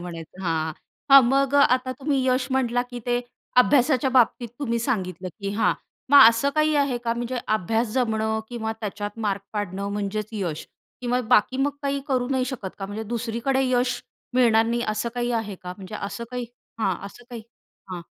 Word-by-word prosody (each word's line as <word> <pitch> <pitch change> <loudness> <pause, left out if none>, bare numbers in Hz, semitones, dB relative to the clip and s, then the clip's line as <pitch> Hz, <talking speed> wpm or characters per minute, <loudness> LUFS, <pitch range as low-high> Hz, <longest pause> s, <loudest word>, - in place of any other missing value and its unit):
म्हणायचं 175 +1 -8
हां, 160 -2 -1 0.4
हां. 275 0 +11
मग 275 +2 +2
अ, - - +6 0.2
आता 255 0 -3
तुम्ही 275 -2 0
यश 255 0 +2
म्हटला 245 -2 +1
की 245 - -6
ते 245 0 +1 0.4
अभ्यासाच्या 260 +1 +4
बाबतीत 245 -1 +3
तुम्ही 235 -5 -1
सांगितलं 190 - -2
की 200 0 -3
हां, 220 - +3 0.4
मग 285 - +9
असं 230 +5 +1
काही 305 0 +3
आहे 275 -4 +1
का 235 -1 -1
म्हणजे 240 +1 -3
अभ्यास 220 +3 0
जमणं 220 -3 0
किंवा 220 -2 -3
त्याच्यात 205 0 -5
मार्क 200 -1 -1
पाडणं 200 -1 -3
म्हणजेच 205 +1 -3
यश 180 -8 -4 0.3
किंवा 250 0 0
बाकी 250 +1 +4
मग 275 +2 +1
काही 280 0 -1
करू 250 -2 0
नाही 260 -2 +1
शकत 245 -7 -5
का? 195 - -4
म्हणजे 205 +2 -5
दुसरीकडे 235 +4 -1
यश 250 0 +1 0.3
मिळणार 230 -3 +5
नाही 235 +1 0
असं 215 +2 -1
काही 240 0 -1
आहे 220 -3 -2
का? 180 0 -6
म्हणजे 195 +1 -9
असं 200 +3 -5
काही 250 -1 -4 0.3
हां, 195 -4 +1
असं 245 +4 -13
काही 235 -2 -7 0.5
हां. 180 -1 -5
235 Hz, 180 wpm, -24 LUFS, 205-255 Hz, 0.5 s, हां